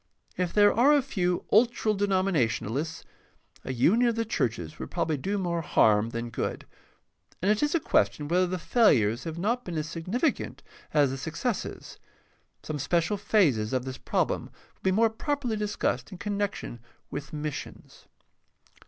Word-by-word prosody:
If 180 -2 -1
there 205 -1 +5
are 260 +7 +5
a 290 - +4
few 180 -9 -1
ultra 225 -1 +3
denominationalists, 160 - 0 0.6
a - - -4
union 215 - +3
of 230 - -1
the 230 0 -1
churches 110 - -2
would - - -6
probably 160 - -1
do 195 +9 -2
more 175 -3 -1
harm 110 -7 +3
than 115 0 -5
good, - - -3 0.7
and 195 +4 +2
it 215 - +1
is 295 +2 +1
a - - +3
question 150 - +1
whether 180 +3 +2
the 185 +1 -2
failures 130 - +3
have 165 0 -5
not 235 +8 0
been 175 -3 -5
as 155 0 -2
significant 185 - -2 0.3
as 145 -3 +3
the 135 - -4
successes. 170 - -4 0.6
Some 150 -1 -4
special 170 +7 +1
phases 145 - +2
of 130 -1 0
this 130 0 -6
problem - - 0
will - - -22
be 190 - +2
more 220 +3 +3
properly 260 0 -2
discussed 210 0 -2
in 185 - -8
connection 205 - -3 0.3
with 140 +1 -6
missions. 150 -1 -7
180 Hz, 160 wpm, -27 LUFS, 145-215 Hz, 0.7 s, there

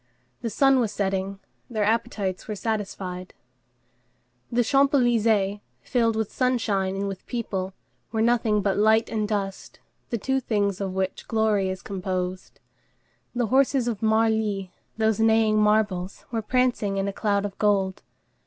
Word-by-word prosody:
The 230 - -2
sun 270 +3 +4
was 225 -4 0
setting; 195 0 -2 0.3
their 220 -3 -1
appetites 215 -4 -1
were 215 - -3
satisfied. 190 -4 -4 1.2
The 245 +1 +3
Champs 275 +4 +3
Élysées, 220 -5 +2 0.2
filled 230 -3 +1
with 220 -2 -2
sunshine 215 -7 0
and 200 +1 -2
with 195 -2 -6
people, 195 -5 -3 0.4
were 220 0 +1
nothing 225 -3 +2
but 195 -1 +1
light 220 +1 +3
and 215 -2 -1
dust, 200 -2 -4 0.3
the 235 - -1
two 265 +5 0
things 205 -5 -1
of 190 -1 -2
which 190 0 -2
glory 215 -4 +1
is 185 0 -5
composed. 185 -1 -4 0.8
The 240 -1 +1
horses 265 -2 +3
of 225 -4 -2
Marly, 220 -3 +1 0.3
those 220 -1 +1
neighing 220 -1 +4
marbles, 210 -3 +1
were 225 -2 -1
prancing 235 -4 +1
in 195 0 0
a 200 - -2
cloud 200 -1 0
of 200 -1 -5
gold. 195 -3 +1
210 Hz, 145 wpm, -25 LUFS, 195-230 Hz, 1.2 s, sun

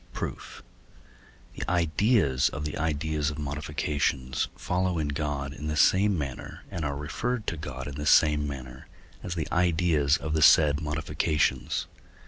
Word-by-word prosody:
Proof. - - -6 0.9
The - - -5
ideas 85 - +2
of 75 -2 -5
the 75 - -4
ideas 75 -1 -1
of 75 - -6
modifications 75 -2 -2
follow 90 0 -1
in 75 -2 -1
God 70 -2 -3
in 75 +2 -7
the 75 0 -2
same 95 +4 +4
manner, 70 -4 -6
and 85 - -4
are 70 -1 -2
referred 110 - -3
to - - -2
God 75 -3 -6
in 75 - -6
the 75 +2 -4
same 75 -1 +4
manner, 65 -2 -8 0.3
as 90 - -5
the 80 -3 -2
ideas 85 -4 +2
of 75 +1 -4
the 80 - +1
said 75 0 +6
modifications. 75 -2 0
75 Hz, 150 wpm, -27 LUFS, 70-80 Hz, 0.9 s, said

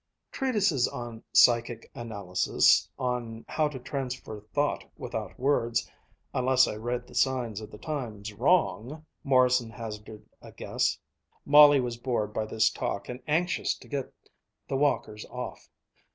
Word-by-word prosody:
"Treatises 205 - +1
on 120 -2 -7
psychic 120 -1 +4
analysis, 100 -5 +2
on 120 -3 -3
how 155 -1 +1
to 145 -3 -6
transfer 125 -5 -5
thought 145 0 0
without - - -6
words, 120 -4 +1 0.5
unless 130 +1 +4
I - - -3
read 120 +3 -3
the - - -16
signs 120 -5 0
of 105 - -9
the - - -11
times 110 -6 -5
wrong," 145 - +1 0.2
Morrison 125 -3 +3
hazarded 105 -2 -8
a - - -13
guess. - - -1 0.5
Molly 145 0 +8
was 120 -2 -2
bored 120 -4 -2
by 110 -1 -2
this 110 +1 +2
talk 100 - -4
and 125 +1 -6
anxious 165 +2 +1
to - - -15
get 140 -2 -4 0.6
the 135 - -2
walkers 120 -6 0
off. - - -7
120 Hz, 140 wpm, -28 LUFS, 110-140 Hz, 0.6 s, Molly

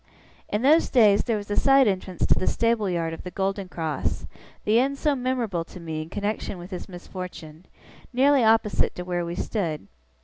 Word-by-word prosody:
In 210 +3 -1
those 310 +5 +5
days 210 -5 +5
there 230 -2 0
was 205 0 -7
a - - +1
side 270 -2 +5
entrance 185 -3 -1
to - - +5
the - - -2
stable 230 -3 +1
yard 165 -2 -1
of - - -7
the 180 - -7
Golden 195 +1 -2
Cross, 160 -5 -3 0.4
the 215 +2 +4
inn 275 +2 +1
so 295 +1 +1
memorable 245 -9 -1
to 180 - -12
me 160 -2 -4
in 155 - -8
connexion 205 0 -3
with 175 +3 -10
his 180 +2 -6
misfortune, 180 -2 -9 0.4
nearly 270 +1 +4
opposite 220 -2 +2
to 180 - -5
where 175 -1 -2
we 170 0 -4
stood. 170 - -3
200 Hz, 195 wpm, -25 LUFS, 175-235 Hz, 0.4 s, those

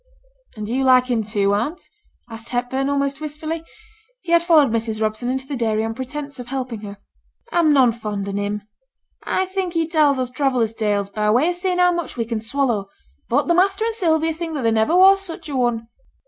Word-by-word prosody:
'And 215 -1 -5
do 220 - -4
you 265 +1 +1
like 255 -1 +4
him, 225 -2 +1
too, 200 -2 0
aunt?' 290 - -2 0.4
asked 225 -1 -9
Hepburn, 255 +3 -1
almost 280 0 -1
wistfully; 310 +2 -5 0.6
he 345 - -6
had 340 0 +6
followed 315 -7 +4
Mrs. 225 -1 -2
Robson 215 +3 -1
into 265 +1 -2
the 280 - -5
dairy 220 -3 0
on 225 - -3
pretence 280 +2 -6
of 245 - -7
helping 250 -4 -4
her. 205 -1 -8 0.5
'I'm 335 -6 +3
none 260 -4 +5
fond 210 -3 -5
on 200 0 -3
him; 205 0 -3 0.6
I 375 - 0
think 375 -2 -3
he 330 -2 0
tells 305 -4 +3
us 255 -1 -2
traveller's 255 -4 0
tales, 205 -3 -1
by 210 0 0
way 250 +10 +3
o' - - +2
seeing 360 +1 -2
how 360 0 +5
much 345 -7 -4
we 230 - -1
can 225 -1 -3
swallow. 230 -4 -1 0.4
But - - +2
the 345 - +3
master 390 +4 +2
and 460 - -1
Sylvia 325 -6 +1
think 325 0 -5
that 275 - -3
there 230 - +3
never 225 +10 +2
was 390 +1 +7
such 335 -4 -7
a 285 - -4
one.' 240 -3 0
260 Hz, 215 wpm, -21 LUFS, 225-325 Hz, 0.6 s, was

